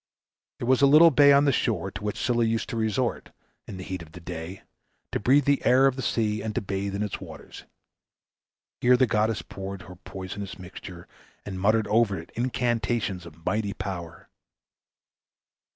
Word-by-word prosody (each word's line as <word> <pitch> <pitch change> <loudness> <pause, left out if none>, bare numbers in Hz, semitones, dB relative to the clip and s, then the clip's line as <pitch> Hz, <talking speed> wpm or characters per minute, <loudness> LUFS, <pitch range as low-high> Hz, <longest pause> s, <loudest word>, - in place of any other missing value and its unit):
There 120 - -5
was 130 +1 +3
a 140 - +7
little 155 +4 +8
bay 145 0 +6
on 140 +1 +5
the 140 - +4
shore 100 -7 -1
to 95 - -8
which 105 -1 -3
Scylla 120 -1 +1
used 115 0 -1
to - - -4
resort, 115 +2 -1 0.4
in 95 - -7
the 95 - -7
heat 95 -1 -5
of 80 -1 -13
the 90 - -9
day, 90 +2 -7 0.5
to - - -1
breathe 130 +6 +4
the 140 -1 +2
air 130 +2 +5
of 135 -2 +3
the 130 - -4
sea, 110 -4 0
and 110 0 -4
to - - +2
bathe 100 0 -3
in 100 - -1
its 105 - -4
waters. - - -11 1.1
Here 125 +1 +5
the 130 - +4
goddess 110 -1 0
poured 95 -1 -7
her 90 +1 -11
poisonous 95 +2 -7
mixture, 90 -1 -10 0.4
and 95 -2 -5
muttered 110 +2 +3
over 105 -1 +2
it 85 - -12
incantations 115 -6 -1
of 85 0 -16
mighty 100 +1 -1
power. 90 -4 -7
105 Hz, 185 wpm, -26 LUFS, 95-120 Hz, 1.1 s, little